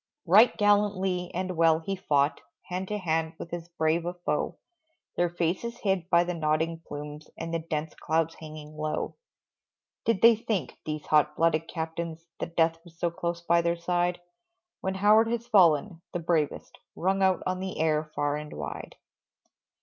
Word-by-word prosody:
Right 210 +8 +6
gallantly 200 -4 +2
and 185 0 -3
well 165 -1 +5
he 180 +4 -3
fought 145 -5 +1 0.2
Hand 185 +1 -4
to 210 - -2
hand 165 -3 -1
with 170 - -8
as 175 0 -5
brave 165 0 +1
a 175 +1 -4
foe, 175 - -2 0.6
Their 175 0 +2
faces 175 +8 -2
hid 190 -5 -1
by 170 0 +5
the 180 0 -3
nodding 160 0 0
plumes, 150 +1 -7
And 165 - -5
the 165 - +1
dense 160 -1 -3
clouds 160 +1 0
hanging 155 -1 -10
low. 155 0 -2 0.9
Did 230 -4 +1
they 230 0 +9
think, 210 - -3
these 155 -1 -3
hot 150 0 +3
blooded 165 0 +2
captains, 165 0 -5
That 170 - -5
Death 165 0 +2
was 170 -2 -17
so 170 0 0
close 170 0 -3
by 170 0 +3
their 170 0 0
side, 175 +1 0 0.6
When 190 0 -2
Howard 210 +3 +5
has 235 0 -2
fallen, 175 -5 +4
the 175 - -1
bravest 160 -3 -1 0.2
Rung 190 +2 +1
out 190 -1 +3
on 185 0 -1
the 190 0 -5
air 155 -1 +2
far 145 0 0
and 150 0 -7
wide. 75 -1 -6
170 Hz, 170 wpm, -28 LUFS, 160-185 Hz, 0.9 s, they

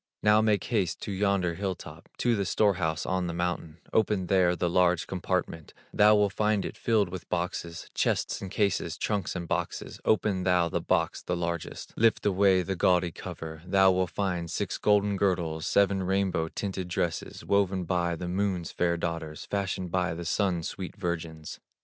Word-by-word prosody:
Now 105 +1 +5
make 105 -3 +2
haste 105 -7 -1
to - - -4
yonder 95 -3 +1
hill 95 +1 -2
top, 85 +2 -12
To 120 -1 +2
the 100 - 0
store 100 +2 +3
house 80 -4 -2
on 95 -1 0
the 85 - -4
mountain, 85 -2 -2 0.2
Open 105 -4 +2
there 90 -1 +3
the 90 - 0
large 90 0 +3
compartment, 90 -3 -3 0.2
Thou 105 +1 +6
will 105 -1 +3
find 105 0 +1
it - - -5
filled 110 -5 +1
with 90 0 -8
boxes, 85 -1 -3
Chests - - 0
and 95 - -5
cases, 90 -5 0
trunks 100 -4 -2
and 85 -2 -4
boxes; - - -3
Open 105 -3 +2
thou 90 -2 +2
the - - -1
box, - - 0
the 90 - -2
largest, 85 -1 -4
Lift 115 0 +2
away 95 -2 +4
the 95 +2 -2
gaudy 90 -1 +2
cover, 80 -3 -8
Thou 95 +1 +4
will 95 0 +1
find 90 -1 -2
six - - -3
golden 105 -1 +3
girdles, 85 -5 0
Seven 100 -1 +3
rainbow 95 -3 0
tinted 95 +1 -4
dresses, 85 -1 -3
Woven 95 -2 +2
by 85 -1 0
the 90 +2 -5
Moon's 90 -2 -1
fair 85 -1 0
daughters, 85 -3 -4
Fashioned 95 -3 -2
by 90 -2 0
the 85 +1 -6
Sun's 90 -2 0
sweet 95 -1 -6
virgins. 85 -4 -4
90 Hz, 180 wpm, -28 LUFS, 85-100 Hz, 0.2 s, Thou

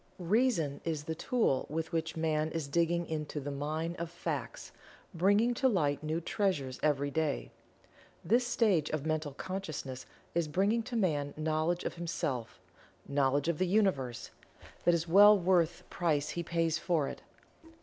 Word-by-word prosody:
Reason 180 - +1
is 160 -3 -2
the 160 - -3
tool 165 - 0
with 160 +2 -3
which 160 -1 -2
Man 155 -1 0
is 160 -4 -3
digging 170 +3 +1
into 150 -2 -4
the 145 0 -5
mine 155 +4 -3
of 170 -1 -3
Facts, - - -5 0.4
bringing 205 +7 +3
to 265 +2 +2
light 150 - +1
new 155 +1 -1
treasures 165 -8 -1
every 145 -1 +1
day. 155 -1 -1 0.7
This 240 +3 +3
stage 195 -11 +2
of 155 -2 -3
Mental 155 -2 -1
Consciousness 155 -9 -5 0.3
is 170 -2 +1
bringing 200 +9 +1
to 240 +2 -6
Man 150 -9 0
knowledge 160 +3 0
of - - -3
himself 145 -8 -3 0.5
knowledge 140 +1 +1
of 170 -3 0
the 185 - +2
Universe 175 - 0 0.5
that 175 - +5
is 170 0 -2
well 205 +4 +8
worth 175 -2 +2
the - - -18
price 155 -5 -1
he 170 - -3
pays 165 -1 0
for 160 -6 +1
it. - - -7
165 Hz, 160 wpm, -32 LUFS, 150-185 Hz, 0.7 s, well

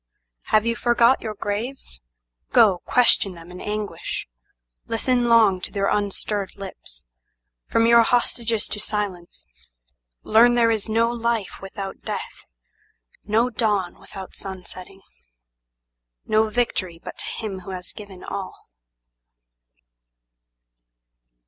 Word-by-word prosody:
Have 215 0 +3
you 230 0 +1
forgot 240 +1 +4
your 215 -2 -4
graves? 205 - -4 0.5
Go, 205 -6 +5
question 220 -6 +4
them 170 +1 -12
in 180 - -9
anguish, 210 0 -4 0.6
Listen 245 +2 +1
long 220 -6 +5
to - - -5
their 200 -1 0
unstirred 205 -1 -1
lips. 185 - -8 0.6
From 230 - +3
your 235 0 +7
hostages 230 -1 +1
to 210 - -3
silence, 200 -5 -4 0.8
Learn 235 +3 +6
there 235 -1 +4
is 220 -1 -1
no 230 +2 +2
life 235 -4 -2
without 195 0 -7
death, - - -6 0.8
no 225 +4 +2
dawn 205 -6 0
without 190 -1 -10
sun 190 -2 -7
setting, 190 +2 -11 1.2
No 215 0 +3
victory 205 -7 -1
but - - -8
to - - 0
Him 205 -4 -4
who 185 - -11
has 180 -1 -6
given 200 -3 -11
all." 190 - -7
210 Hz, 115 wpm, -23 LUFS, 190-230 Hz, 1.2 s, your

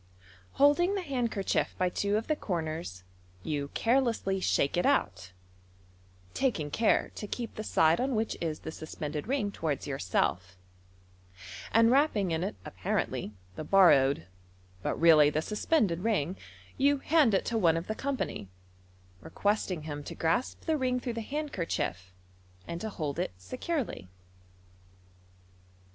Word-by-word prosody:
Holding 345 +8 +4
the 390 - -2
handkerchief 245 - -1
by 185 -1 +1
two 200 +3 0
of 225 - -2
the 310 - 0
corners, 160 - -4 0.4
you 145 -2 -2
carelessly 230 -6 +1
shake 140 -6 +1
it 175 - +1
out 95 - 0 1.0
(taking 170 - -1
care 225 +6 +2
to 210 - -6
keep 235 +2 -5
the 215 - -5
side 160 -3 +3
on 260 -1 0
which 220 +1 -1
is 160 -2 -3
the 160 - -6
suspended 155 -1 -6
ring 250 -6 0
towards 155 -7 -3
yourself), 95 -6 -1 1.1
and 230 +1 +5
wrapping 250 - +2
in 160 +1 0
it 185 - -3
appaientlv 105 - -3 0.2
the - - -5
borrowed, 140 - +5 0.6
but - - -2
really 155 -3 +7
the 150 - 0
suspended 210 - +1
MODERN 225 +4 +1
MAGIC, 145 -8 0
ring, 185 - -6 0.4
you 285 +1 +4
hand 280 -6 +3
it - - 0
to 235 - -1
one 165 -4 +4
of 165 - -4
the 215 - -2
company, 265 - -3 0.7
requesting 200 -5 -1
him 145 -1 -5
to - - -7
grasp 165 +11 0
the 320 -2 +1
ring 255 -2 0
through 245 -1 -4
the 230 - -4
handkerchief, 190 - -3 0.6
and 170 +1 -5
to 220 - -3
hold 150 -8 -4
it - - -2
securely. 255 - -4
195 Hz, 145 wpm, -30 LUFS, 155-250 Hz, 1.1 s, really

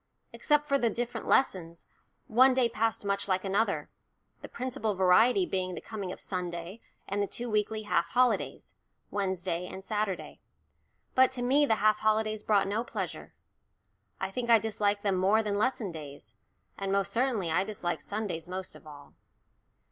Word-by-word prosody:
Except 295 0 +1
for 280 0 +2
the 235 - +2
different 240 +2 -4
lessons, 170 -10 +1 0.4
one 255 +3 +5
day 255 -2 +4
passed 225 -2 -1
much 200 0 0
like 185 0 0
another, 200 +4 0 0.5
the - - -9
principal 250 -4 -3
variety 220 - +4
being 185 - -2
the - - -5
coming 200 -5 -6
of - - -8
Sunday 180 +1 -5 0.3
and 200 +1 -1
the 200 - 0
two 240 +2 -4
weekly 215 +1 0
half 170 -5 0
holidays 250 +6 +1 0.4
Wednesday 185 -3 -2
and 190 - -8
Saturday. 210 -2 -3 0.7
But 260 0 +5
to 245 -2 -2
me 285 +4 +3
the 220 - +3
half 215 0 +3
holidays 215 0 +1
brought 205 -2 +2
no 210 +4 -1
pleasure. - - -6 0.8
I 190 0 -3
think 235 +3 -3
I 230 - +8
disliked 205 -1 0
them 195 -2 +1
more 200 +4 +3
than 205 -1 -1
lesson 230 -4 0
days, 145 -8 -10 0.5
and 195 0 -2
most 200 0 0
certainly 230 -8 +1
I 180 +4 +2
disliked 195 -4 -3
Sundays 200 -6 -4
most 185 +1 -5
of - - -15
all. 145 -1 -13
205 Hz, 165 wpm, -29 LUFS, 185-230 Hz, 0.8 s, I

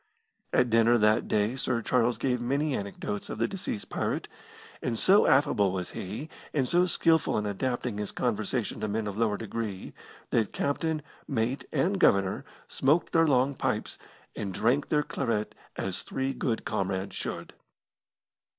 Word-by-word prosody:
At 125 -2 +3
dinner 115 +1 +5
that 105 -1 +3
day 105 +3 +1
Sir 130 -3 0
Charles 120 0 +2
gave 125 0 0
many 140 +4 0
anecdotes 100 +1 -4
of - - -4
the 115 +1 +1
deceased 150 - -5
pirate; - - -2 0.5
and 115 -2 -1
so 195 - +5
affable 105 -8 +4
was 90 -1 -3
he, 105 +11 -5 0.3
and 135 -4 +2
so 175 +4 +4
skilful 165 -1 +2
in 105 - -1
adapting 120 +1 -2
his 105 - -3
conversation 115 -1 -1
to 110 - -1
men 110 +1 -1
of 100 -2 -4
lower 110 -2 +1
degree, 110 -3 -5 0.4
that 110 -3 +1
captain, 155 +2 -1 0.2
mate, 125 +1 -1
and 195 +2 +1
Governor 100 - +3 0.2
smoked 150 +6 +1
their 165 -1 +5
long 135 0 +3
pipes, - - -2 0.4
and 100 -3 -3
drank 125 +6 +2
their 150 -1 +2
claret 115 -7 -2 0.2
as - - -2
three 135 0 -2
good 115 -4 -2
comrades 95 0 -2
should. - - -4
120 Hz, 155 wpm, -28 LUFS, 105-140 Hz, 0.5 s, dinner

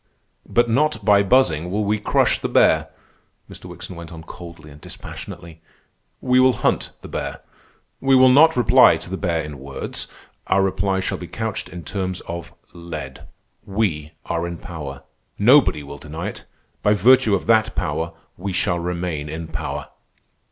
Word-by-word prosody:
"But 120 0 +3
not 150 +7 +1
by 100 -2 +6
buzzing 95 - +2
will 105 +3 -1
we 105 +1 0
crush 105 - +2
the - - -3
bear," - - +4 0.6
Mr. - - -12
Wickson 90 - -9
went 85 0 -9
on 80 -1 -9
coldly 85 -2 -11
and 75 +1 -15
dispassionately. 85 -1 -9 0.6
"We 125 0 +3
will 130 0 +5
hunt - - +1
the - - -8
bear. - - -5 0.6
We 135 0 +3
will 130 0 +7
not 155 +5 +6
reply 125 - +6
to - - -9
the - - -1
bear 85 -4 -1
in 75 -2 -8
words. 70 0 -6 0.4
Our 95 +1 +3
reply 95 0 0
shall - - -3
be 90 - -7
couched 110 +3 -4
in 90 -2 -8
terms 95 +1 -3
of 85 -1 -7 0.2
lead. 80 -6 -8 0.4
We 85 -7 -2
are 85 0 -2
in 85 0 -5
power. 70 -5 -8 0.3
Nobody 115 - +5
will 70 0 -9
deny 80 0 -5
it. - - -11 0.4
By 105 0 +3
virtue 115 +1 +5
of 95 - -3
that 110 -1 +3
power 85 +1 -2 0.2
we 95 +2 -4
shall 90 -1 0
remain 85 -4 -3
in 80 +1 -6
power." - - -5
90 Hz, 165 wpm, -21 LUFS, 80-105 Hz, 0.6 s, will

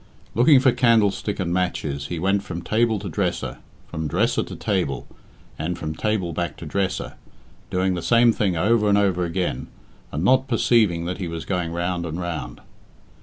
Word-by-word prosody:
Looking 130 +5 +6
for 130 0 +4
candlestick 110 -5 +2
and 85 -2 -1
matches, 75 -6 -1
he 85 - -4
went 95 +4 +1
from 90 -3 -6
table 110 +3 +2
to 100 0 -6
dresser, 80 - -2 0.3
from 80 0 -4
dresser - - +1
to - - -6
table, 90 - -2 0.5
and 85 +3 -2
from 80 -1 -4
table 95 -2 -1
back 85 +1 -3
to - - -8
dresser, 95 +4 -2 0.6
doing 95 0 +1
the 90 - -3
same 120 +2 +4
thing 95 -6 0
over 105 +4 +3
and 100 - +4
over 95 -3 +2
again, 90 +1 -2 0.4
and 75 +4 -2
not 130 +5 +4
perceiving 110 -8 +2
that 90 +2 -4
he 90 - -3
was 85 -1 -5
going 90 -3 -2
round 85 0 -2
and 80 +2 -4
round. 80 -9 -5
90 Hz, 175 wpm, -23 LUFS, 85-105 Hz, 0.6 s, Looking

